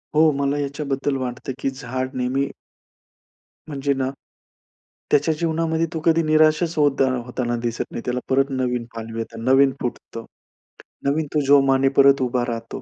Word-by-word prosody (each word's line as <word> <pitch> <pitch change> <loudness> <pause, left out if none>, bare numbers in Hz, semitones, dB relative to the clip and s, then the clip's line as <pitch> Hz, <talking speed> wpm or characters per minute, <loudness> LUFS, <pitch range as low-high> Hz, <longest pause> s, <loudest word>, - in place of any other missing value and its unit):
हो, 155 0 +5
मला 140 0 -1
याच्याबद्दल 140 -1 -2
वाटतं, 130 0 -4
की - - 0
झाड 130 -1 -5
नेहमी 130 +2 0 1.2
म्हणजे 140 -2 -1
ना, 135 -1 -1 1.0
त्याच्या 145 +2 +3
जीवनामध्ये 165 0 0
तो 160 - -2
कधी 165 0 +4
निराशच 155 +1 +3
होदा 145 -2 +3 0.2
होताना 120 -1 -2
दिसत 120 -1 -2
नाही. - - -5
त्याला 125 0 -1
परत 135 +1 +2
नवीन 125 -2 -1
पालवी 115 0 -6
येतात, 115 0 -6
नवीन 135 +3 +4
फुटतं, 115 -2 -5 0.8
नवीन 150 +3 +1
तो 150 - +2
जोमाने 135 -1 +5
परत 140 0 +6
उभा 125 -1 0
राहतो. 115 -1 -5
135 Hz, 145 wpm, -22 LUFS, 125-145 Hz, 1.2 s, परत